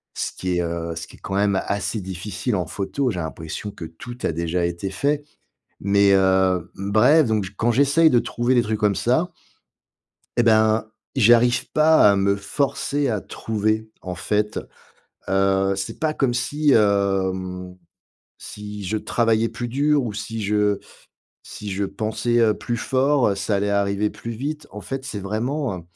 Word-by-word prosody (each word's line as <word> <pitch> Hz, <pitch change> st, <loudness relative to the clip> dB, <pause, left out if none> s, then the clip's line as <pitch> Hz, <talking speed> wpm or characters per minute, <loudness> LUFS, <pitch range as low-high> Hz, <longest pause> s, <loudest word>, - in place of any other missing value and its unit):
Ce -, -, -2 dB
qui 90 Hz, -1 st, -2 dB
est, -, -, +1 dB
heu, 85 Hz, 0 st, -3 dB
ce 80 Hz, 0 st, -6 dB
qui -, -, -15 dB
est -, -, -23 dB
quand 95 Hz, -, -6 dB
même 100 Hz, -1 st, +2 dB
assez 100 Hz, +2 st, -2 dB
difficile 100 Hz, +5 st, -3 dB
en 90 Hz, -2 st, -1 dB
photo, 125 Hz, +7 st, -2 dB
j'ai 90 Hz, -, -4 dB
l'impression 80 Hz, +5 st, -6 dB
que 85 Hz, -, -8 dB
tout 85 Hz, +10 st, -10 dB
a -, -, +1 dB
déjà 85 Hz, +2 st, -1 dB
été 85 Hz, +3 st, -3 dB
fait 145 Hz, +8 st, 0 dB, 0.6 s
mais 100 Hz, 0 st, +4 dB
heu, 95 Hz, -2 st, +2 dB
bref, 110 Hz, +9 st, +4 dB
donc 110 Hz, -2 st, +1 dB
j 95 Hz, -, -8 dB
quand 120 Hz, +4 st, +1 dB
j'essaye 145 Hz, +6 st, +4 dB
de 125 Hz, -, +4 dB
trouver 120 Hz, +2 st, 0 dB
des 120 Hz, -, +5 dB
trucs 110 Hz, -1 st, -2 dB
comme 105 Hz, -2 st, +2 dB
ça 155 Hz, +9 st, +1 dB, 1.1 s
et -, -, +6 dB
ben, 110 Hz, -1 st, +3 dB, 0.2 s
j'y 120 Hz, -3 st, +6 dB
arrive 120 Hz, +1 st, +2 dB
pas 155 Hz, -7 st, +6 dB
à 100 Hz, -, +2 dB
me 100 Hz, 0 st, +2 dB
forcer 140 Hz, +6 st, -1 dB
à 110 Hz, -4 st, -1 dB
trouver, 110 Hz, +1 st, -2 dB
en 90 Hz, -1 st, -5 dB
fait. 105 Hz, +3 st, -1 dB, 0.7 s
Heu, 95 Hz, 0 st, +2 dB
c'est 95 Hz, 0 st, -5 dB
pas 155 Hz, -1 st, 0 dB
comme 130 Hz, -5 st, +1 dB
si, 145 Hz, +4 st, +1 dB
hem, 95 Hz, -3 st, +1 dB, 0.6 s
si 105 Hz, -1 st, -8 dB
je 100 Hz, +4 st, -1 dB
travaillais 115 Hz, 0 st, +1 dB
plus 120 Hz, +1 st, -5 dB
dur 145 Hz, +3 st, +2 dB
ou 110 Hz, -, -3 dB
si 110 Hz, +2 st, -5 dB
je 105 Hz, 0 st, +1 dB, 0.6 s
si 105 Hz, -1 st, -8 dB
je 100 Hz, +1 st, -1 dB
pensais, 110 Hz, +4 st, -1 dB
heu, 110 Hz, -2 st, +4 dB
plus 120 Hz, -, -3 dB
fort, 130 Hz, -3 st, +2 dB
ça 100 Hz, +2 st, -1 dB
allait 100 Hz, +1 st, 0 dB
arriver 100 Hz, +1 st, +1 dB
plus 115 Hz, -, -7 dB
vite. 145 Hz, +6 st, -5 dB
En 105 Hz, -, -7 dB
fait, 135 Hz, +7 st, -5 dB
c'est 110 Hz, -6 st, -5 dB
vraiment, 115 Hz, +3 st, -2 dB
heu, -, -, -10 dB
105 Hz, 175 wpm, -22 LUFS, 95-120 Hz, 1.1 s, et